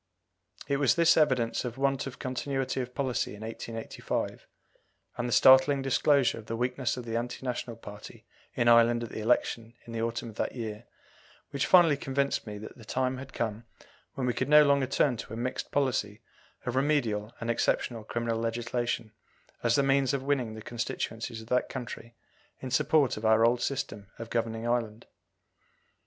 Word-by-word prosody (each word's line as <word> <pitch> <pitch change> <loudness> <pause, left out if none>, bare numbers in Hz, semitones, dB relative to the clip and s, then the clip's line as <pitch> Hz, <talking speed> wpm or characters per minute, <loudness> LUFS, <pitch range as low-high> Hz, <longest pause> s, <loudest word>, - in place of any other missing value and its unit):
It 140 - +1
was 140 -2 +3
this 170 0 +5
evidence 130 -7 +2
of 125 -1 -5
want 135 0 0
of 135 - -8
continuity 135 0 -2
of 125 0 -7
policy 130 -6 -1
in 105 - -12
1885, 115 0 -5 0.7
and 120 0 -2
the - - -4
startling 130 +3 +6
disclosure 135 -1 +3
of 110 - -13
the 115 - -3
weakness 125 +1 -1
of 125 - -6
the 115 -1 -4
anti 120 +3 -3
national 120 -1 -3
party 105 -2 -11 0.3
in 120 - +1
Ireland 120 0 +5
at 115 - -6
the - - -5
election 115 0 0
in 115 - -9
the 115 - -2
autumn 115 0 -2
of 110 - -18
that - - -2
year, 110 -1 -5 0.7
which 140 -1 -1
finally 170 -6 +6
convinced 140 -2 -1
me 105 -1 -6
that 110 +1 -10
the - - -12
time 130 +3 -1
had 130 0 -9
come 115 0 -3 0.5
when 130 - -2
we 125 - +1
could - - -2
no 150 0 +8
longer 140 -2 +3
turn 135 -2 +2
to 110 - -8
a - - -6
mixed 125 +2 -3
policy 120 -6 0 0.4
of 125 - -2
remedial 120 -7 0
and 115 +1 -1
exceptional 115 0 0
criminal 115 +1 -2
legislation 115 0 -2 0.5
as 120 0 +2
the 140 - +3
means 135 0 +2
of 135 - -3
winning 130 -6 -1
the 110 - -9
constituencies 115 -1 -4
of 110 - -13
that 125 - +1
country 120 -2 -7 0.4
in 130 - -6
support 145 -1 +3
of 110 - -7
our 110 +1 +5
old 120 +1 +2
system 105 -7 -3
of 115 0 -8
governing 115 0 -1
Ireland. 115 -2 -1
120 Hz, 180 wpm, -29 LUFS, 115-135 Hz, 0.7 s, no